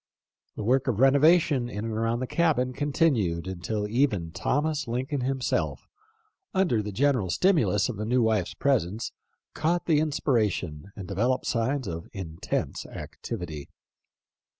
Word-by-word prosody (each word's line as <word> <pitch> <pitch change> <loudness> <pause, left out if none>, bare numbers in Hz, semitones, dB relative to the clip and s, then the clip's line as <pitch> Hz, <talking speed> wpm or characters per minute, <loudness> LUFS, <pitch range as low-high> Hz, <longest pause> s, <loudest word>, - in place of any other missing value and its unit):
The - - -4
work 130 +5 +2
of 115 -5 0
renovation 140 -1 +4
in 105 -1 -4
and 115 - -3
around 115 +2 0
the - - 0
cabin 130 -4 +1
continued 130 - +1
until 95 +3 -3
even 105 -8 +1
Thomas 150 - -1
Lincoln 130 +4 -2
himself, 130 0 -1 0.7
under 175 - +2
the 105 0 -5
general 125 -3 +1
stimulus 160 - +3
of 125 -5 -5
the 105 - -3
new 125 +2 +2
wife's 110 -5 +1
presence, 115 -6 0 0.4
caught 170 +2 0
the 155 -3 +3
inspiration, 105 - 0
and 95 -3 -7
developed 120 +7 0
signs 130 +3 0
of 85 -2 -6
intense 85 -5 -3
activity. 80 -10 -7
120 Hz, 135 wpm, -27 LUFS, 100-140 Hz, 0.7 s, renovation